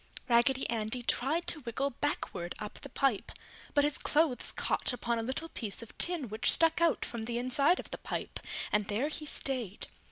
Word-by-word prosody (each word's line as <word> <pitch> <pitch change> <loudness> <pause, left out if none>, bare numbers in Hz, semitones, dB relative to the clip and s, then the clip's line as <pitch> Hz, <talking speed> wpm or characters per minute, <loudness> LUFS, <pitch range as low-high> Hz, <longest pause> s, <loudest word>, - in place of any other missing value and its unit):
Raggedy 250 +2 +3
Andy 230 +2 -1
tried 295 +8 +1
to 320 - 0
wiggle 270 +2 -2
backward 210 -10 -3
up 210 -1 -7
the 280 - -9
pipe, 260 -5 0 0.4
but 290 - +5
his 295 0 +1
clothes 295 -4 +1
caught - - 0
upon 235 -1 -1
a - - 0
little 265 +8 -3
piece 220 -5 -3
of 230 - -14
tin 340 -7 +5
which 215 +2 +3
stuck 325 0 +3
out 335 -2 +2
from 230 -2 -5
the 235 0 -2
inside 275 +8 +3
of - - -7
the - - -3
pipe - - -4 0.3
and 210 -1 +2
there 220 +8 0
he 305 0 -3
stayed. 250 -9 -3
250 Hz, 190 wpm, -31 LUFS, 230-290 Hz, 0.4 s, but